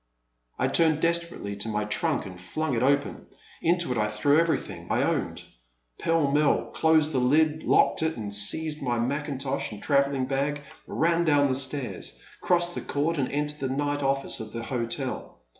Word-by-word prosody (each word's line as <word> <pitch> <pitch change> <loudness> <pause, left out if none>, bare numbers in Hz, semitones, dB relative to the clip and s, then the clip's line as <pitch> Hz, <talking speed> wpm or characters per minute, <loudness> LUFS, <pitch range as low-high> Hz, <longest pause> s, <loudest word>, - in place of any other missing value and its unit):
I 130 - +1
turned 155 +2 +3
desperately 170 -11 -1
to 105 +2 -3
my 105 -1 -1
trunk 145 +8 0
and 90 -2 -9
flung 155 +10 -2
it 115 - 0
open. 140 +2 +1 0.3
Into 170 -3 +2
it 125 - 0
I 105 - +2
threw 105 +8 +3
everything 165 -1 -1
I - - +2
owned, - - -1 0.6
pell 165 -4 +2
mell, 145 0 +2
closed 160 -1 +3
the 135 - +1
lid, 155 +5 +3
locked - - +3
it, 160 -2 0
and 105 -3 -5
seizing 150 +10 -2
my 120 -2 0
mackintosh 140 +1 -2
and 105 - -8
travelling 140 -2 +2
bag, 140 +2 -1 0.3
ran 170 +1 +1
down 145 -3 +3
the - - +1
stairs, 130 0 -3 0.2
crossed 175 -1 +1
the - - -4
court 150 +2 -1
and 130 - -1
entered 150 +1 -2
the 135 - -2
night 145 0 -1
office 135 0 0
of 110 -1 -7
the 115 0 -4
hotel. 125 +2 -3
140 Hz, 175 wpm, -27 LUFS, 125-155 Hz, 0.6 s, turned